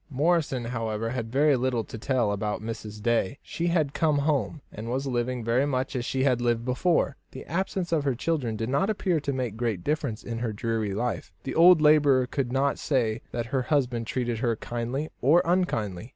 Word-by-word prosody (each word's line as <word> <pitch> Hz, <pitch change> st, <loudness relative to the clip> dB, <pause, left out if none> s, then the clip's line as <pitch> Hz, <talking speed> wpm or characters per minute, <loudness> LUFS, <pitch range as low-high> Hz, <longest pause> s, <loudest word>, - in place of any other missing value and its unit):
Morrison, 145 Hz, -3 st, +1 dB
however, 115 Hz, -1 st, -2 dB
had 115 Hz, -3 st, -4 dB
very 145 Hz, +2 st, +4 dB
little 125 Hz, -2 st, 0 dB
to -, -, -10 dB
tell 115 Hz, -1 st, 0 dB
about 105 Hz, +1 st, -2 dB
Mrs. 110 Hz, -1 st, -7 dB
Day. 115 Hz, 0 st, +1 dB
She 170 Hz, -, -3 dB
had 155 Hz, -5 st, +1 dB
come 155 Hz, -3 st, +2 dB
home, 145 Hz, -2 st, 0 dB
and 110 Hz, +2 st, -7 dB
was 130 Hz, +3 st, -1 dB
living 125 Hz, -1 st, -1 dB
very 120 Hz, +5 st, +2 dB
much 130 Hz, -1 st, -1 dB
as 120 Hz, -1 st, -2 dB
she 130 Hz, +1 st, 0 dB
had 125 Hz, -3 st, +2 dB
lived 120 Hz, -1 st, 0 dB
before. 140 Hz, +3 st, +1 dB, 0.2 s
The 130 Hz, -, -8 dB
absence 185 Hz, +1 st, -2 dB
of 160 Hz, -3 st, +2 dB
her 135 Hz, -3 st, 0 dB
children 130 Hz, -5 st, -1 dB
did 110 Hz, +2 st, -3 dB
not 140 Hz, +10 st, +1 dB
appear 190 Hz, -5 st, +1 dB
to 140 Hz, -1 st, -2 dB
make 125 Hz, -5 st, -3 dB
great 115 Hz, -7 st, -2 dB
difference 145 Hz, -7 st, -2 dB
in 115 Hz, -1 st, -4 dB
her 115 Hz, -2 st, -2 dB
dreary 110 Hz, -2 st, -2 dB
life. 120 Hz, +3 st, -2 dB
The 135 Hz, -, -4 dB
old 170 Hz, 0 st, +7 dB
labourer 145 Hz, -4 st, +5 dB
could 125 Hz, -1 st, -2 dB
not 135 Hz, +2 st, +1 dB
say 120 Hz, -6 st, 0 dB
that 120 Hz, -1 st, -2 dB
her 135 Hz, -, +2 dB
husband 125 Hz, -4 st, 0 dB
treated 120 Hz, -3 st, -2 dB
her 115 Hz, -1 st, +1 dB
kindly 120 Hz, +7 st, -3 dB
or 160 Hz, +7 st, +5 dB
unkindly. 115 Hz, -, 0 dB
125 Hz, 200 wpm, -27 LUFS, 115-145 Hz, 0.2 s, old